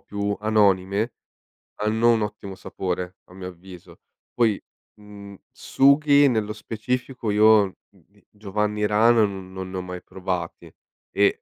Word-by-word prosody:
più 100 0 -3
anonime 105 0 +2 0.7
hanno 110 +3 +2
un 110 - 0
ottimo 100 -2 -6
sapore, 90 0 -5
a 90 - -18
mio 95 -1 -8
avviso. 90 0 -14 0.3
Poi, 115 -4 +2 0.4
mhmm, 100 -1 -12 0.2
sughi 140 +1 +4
nello 110 -3 -1
specifico 120 +2 -4
io, 105 -2 +4
mhmm, 95 -5 -26
i 105 - -27
Giovanni 105 0 -2
Rana 110 +2 +4
no 95 -2 -5
non 95 0 -8
li 95 - -8
ho - - -2
mai 90 0 -7
provati 95 -1 -5 0.4
e 100 0 +2
105 Hz, 135 wpm, -23 LUFS, 95-110 Hz, 0.7 s, sughi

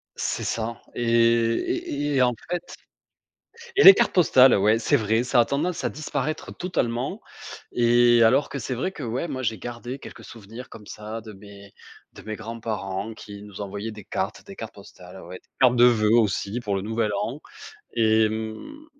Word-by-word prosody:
C'est - - -3
ça 115 +1 -3
et 120 - -2
et 115 0 +1 0.2
et - - 0
et 130 - +3
en 125 -1 +3 0.2
fait 175 0 -1 1.2
et 415 - +5
les 390 - +12
cartes - - +1
postales, 135 -7 +6
ouais, 105 +3 +3
c'est 115 - +2
vrai, 110 +1 +1
ça 125 0 +1
a - - +5
tendance 160 +7 -2
à - - 0
disparaître 155 +1 -4
totalement 135 - -2 0.5
et 120 0 +4
alors 130 +6 +4
que 140 - -5
c'est 130 +1 -4
vrai 160 +10 -2
que 175 -7 -10
ouais, 125 +8 -3
moi 130 -3 -4
j'ai 110 -3 -1
gardé 120 +5 -7
quelques - - -12
souvenirs 115 +3 -11
comme 105 -2 -13
ça 110 +2 -7
de 110 -1 -11
mes 100 0 -14 0.4
de - - -12
mes 110 0 -6
grands-parents 110 -2 -5
qui 100 -2 -11
nous 105 0 -11
envoyaient 100 +2 -5
des 105 -1 -11
cartes - - -4
des - - -11
cartes - - -8
postales, 90 +1 -13
ouais, 90 +2 -9
des - - -34
cartes 125 -1 +5
de 120 - +6
voeux 115 -2 +4
aussi 105 0 0
pour 105 -4 -2
le 95 - -2
nouvel 110 +1 -1
an - - -5 0.5
et 110 -1 +3
mmh 110 - -7
115 Hz, 190 wpm, -24 LUFS, 105-125 Hz, 1.2 s, les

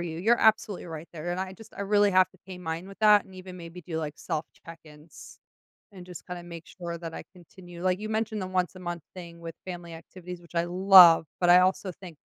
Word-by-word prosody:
you, 165 -2 -5
you're 225 +7 +3
absolutely 220 -4 +2
right 160 -1 -8
there, 170 +2 -4
and 185 - -3
I 190 0 -4
just 220 +3 -15
I - - -7
really 205 0 +3
have 185 0 +5
to 190 - -24
pay 185 -1 -9
mine 165 +1 -5
with 195 0 -13
that 210 -1 +6
and 190 - -17
even 185 0 -10
maybe 170 +1 -10
do 160 0 -5
like 150 -2 -4
self 155 +1 -4 0.2
check-ins 160 -2 -14 0.5
and 185 -2 -11
just 180 -2 -10
kinda 180 -1 -7
make 170 -1 -10
sure 170 -2 -7
that 165 -1 -8
I - - -7
continue 175 0 -13
like, 185 +1 +1
you 215 0 -5
mentioned 220 -1 -2
the 185 - -4
once-a-month 180 -2 -3
thing 170 -2 -10
with 165 -1 -7
family 175 -2 -8
activities, 180 +1 -10
which 170 0 -17
I 170 - +2
love, 180 -3 +7
but 175 -1 +4
I 180 - +8
also 185 +1 +1
think 175 -3 -13
180 Hz, 230 wpm, -27 LUFS, 170-190 Hz, 0.5 s, I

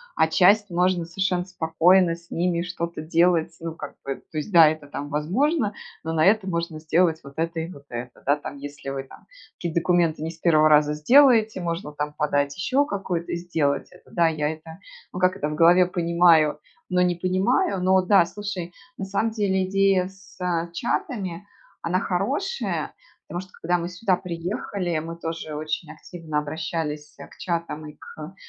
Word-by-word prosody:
а 160 - +4
часть- 200 +4 +4
можно 180 -1 +1
совершенно 180 0 -1
спокойно 175 0 +3
с 170 0 -20
ними 170 0 0
что-то 170 -2 -4
делать. 165 0 +2
Ну, 165 -1 -5
как - - -8
бы 135 0 -3 0.2
То 155 - -2
есть, 150 - -6
да, 165 -4 +8
это 155 -1 -2
там 145 0 -6
возможно, 210 - 0 0.3
но 160 - -3
на 155 -1 +3
это 200 -1 +3
можно 170 -2 -3
сделать 160 +1 +2
вот 140 0 -11
это 165 0 -1
и 165 +3 -4
вот 140 -4 -13
это. 120 +1 -7
Да, 145 +1 +4
там 145 -1 -8
если 145 0 -8
вы 135 0 -4
там 135 - -17 0.3
какие-то 170 -1 -2
документы 170 -3 +1
не 165 - -3
с 165 - -16
1 155 -3 +4
раза 150 0 +4
сделаете, 225 - +5
можно 170 -2 -3
там 150 0 -4
подать 145 -2 0
еще 270 +9 +1
какую-то 180 -4 -3
и - - 0
сделать 165 -5 -1
это. - - -19
Да, 170 -2 +2
я 150 -2 -1
это, 160 +2 -9 0.3
ну, 180 - -4
как 185 0 +3
это, 150 - -2
в - - -4
голове 175 +3 +6
понимаю, 170 -4 +3 0.3
но 180 -1 +2
не 180 0 +2
понимаю. 185 - +1
Но, 190 0 +4
да, 185 -1 +5
слушай, 185 -2 -6 0.2
на 195 - -4
самом 200 +4 0
деле 200 -4 0
идея 195 -1 +2
с, 195 0 -17
э, 170 -1 -1
чатами, 200 -4 -3 0.4
она 180 +2 +1
хорошая, 270 - -2 0.3
потому 175 - -4
что, 185 0 -15
когда 175 +2 +1
мы 170 0 -4
сюда 185 +1 +1
приехали, 175 0 -3
мы 165 +1 -7
тоже 165 -2 -5
очень 155 +1 -4
активно 155 -1 -5
обращались, 150 -1 -4
э, - - -9
к - - -19
чатам 170 -3 -3
и 150 - -10
к 155 +4 -10
170 Hz, 185 wpm, -24 LUFS, 155-185 Hz, 0.4 s, да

